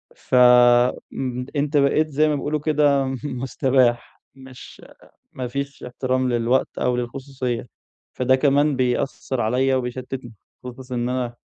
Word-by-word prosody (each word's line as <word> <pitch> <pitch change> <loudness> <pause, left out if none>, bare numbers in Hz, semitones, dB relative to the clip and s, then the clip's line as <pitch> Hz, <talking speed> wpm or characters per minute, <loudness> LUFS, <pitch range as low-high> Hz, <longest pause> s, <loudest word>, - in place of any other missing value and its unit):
ف - - -4 0.8
م 125 -1 -4
أنت 145 +1 0
بقيت 145 +3 +3
زي 150 +2 +2
ما 150 - +1
بيقولوا 150 +1 -2
كده 145 -2 +2
م 130 0 -3
مستباح، 130 -2 0
مش 130 -1 -13 0.5
ما 125 -1 -5
فيش 140 +2 -5
احترام 130 +1 -1
للوقت 120 +2 0
أو 125 0 0
للخصوصية، 125 -1 -4 0.5
فده 130 +1 +2
كمان 145 +1 +2
بيأثّر 130 0 -1
عليّا 130 +4 +1
وبيشتتني، 125 -1 -5 0.3
خصوصًا 125 +1 -8
إن 120 0 -1
أنا 125 -2 -3
130 Hz, 130 wpm, -22 LUFS, 125-140 Hz, 0.8 s, بقيت